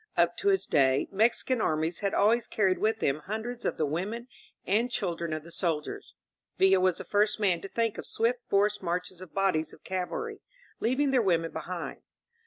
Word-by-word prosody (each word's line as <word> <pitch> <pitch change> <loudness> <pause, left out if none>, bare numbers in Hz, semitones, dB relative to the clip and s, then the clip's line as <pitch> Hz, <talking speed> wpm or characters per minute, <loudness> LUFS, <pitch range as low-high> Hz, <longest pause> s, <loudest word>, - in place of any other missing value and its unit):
Up - - +3
to 405 - -2
his 390 -1 +3
day, 135 -1 +3
Mexican 230 +4 +2
armies 160 +2 0
had 200 -1 0
always 225 +3 +3
carried 190 -4 +1
with 220 +1 +1
them 140 +2 +1
hundreds 220 +4 -4
of - - -1
the 155 - +1
women 200 - -3 0.4
and 225 +5 +2
children 170 -8 -2
of 155 -1 -3
the 170 - -12
soldiers; 160 -4 -3 0.4
Villa 190 0 +5
was 185 -1 +2
the - - -5
first 210 +1 +1
man 185 -5 +2
to 195 - -6
think 230 0 -1
of - - -5
swift 235 +2 +1
forced 205 +1 +2
marches 180 0 -3
of 185 -4 -12
bodies 190 -5 +1
of - - -16
cavalry, 190 - -4 0.4
leaving 265 +4 +1
their 260 -2 +4
women 165 -5 +1
be - - -4
hind. 175 +1 -6
195 Hz, 195 wpm, -29 LUFS, 170-225 Hz, 0.4 s, Villa